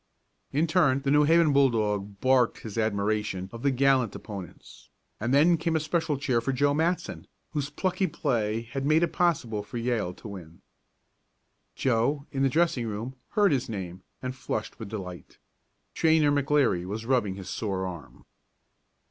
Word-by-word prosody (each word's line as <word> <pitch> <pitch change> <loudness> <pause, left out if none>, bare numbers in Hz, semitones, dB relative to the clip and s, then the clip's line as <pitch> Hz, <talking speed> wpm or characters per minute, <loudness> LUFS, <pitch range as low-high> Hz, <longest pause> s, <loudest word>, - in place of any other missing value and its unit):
In 150 +4 +2
turn 150 -6 +2
the 140 - +1
New 150 0 +5
Haven 165 -1 +4
bulldog 105 -7 +1
barked 130 -2 +3
his 110 -3 -8
admiration 105 -3 -1
of 115 - -8
the 140 - +2
gallant 130 -3 +2
opponents, 100 -5 -10 0.3
and 120 +3 -1
then 160 +5 +5
came 165 0 -1
a - - +3
special 155 -1 -1
cheer 130 -4 0
for 135 - -1
Joe 140 +2 +2
Matson, 165 +4 -1 0.2
whose 145 -2 -2
plucky 185 +5 -1
play 115 -8 -1
had 135 +4 -5
made 155 +4 +3
it 170 - 0
possible 130 -12 +1
for 105 +4 -8
Yale 115 -6 -1
to - - -11
win. 85 -5 -10 1.1
Joe, 135 +4 +1
in 135 - -2
the 135 - +4
dressing 155 -6 +1
room, 110 +5 -5 0.2
heard 205 -2 +4
his 130 -5 0
name, 95 -4 -6 0.2
and 130 0 -3
flushed 110 -4 -4
with 110 -3 -7
delight. 90 -5 -8 0.6
Trainer 160 -2 +3
McLeary 140 -9 +2
was 105 +5 -5
rubbing 115 -7 +1
his 95 -2 -7
sore 95 -4 -2
arm. 90 -2 -9
130 Hz, 165 wpm, -27 LUFS, 105-145 Hz, 1.1 s, New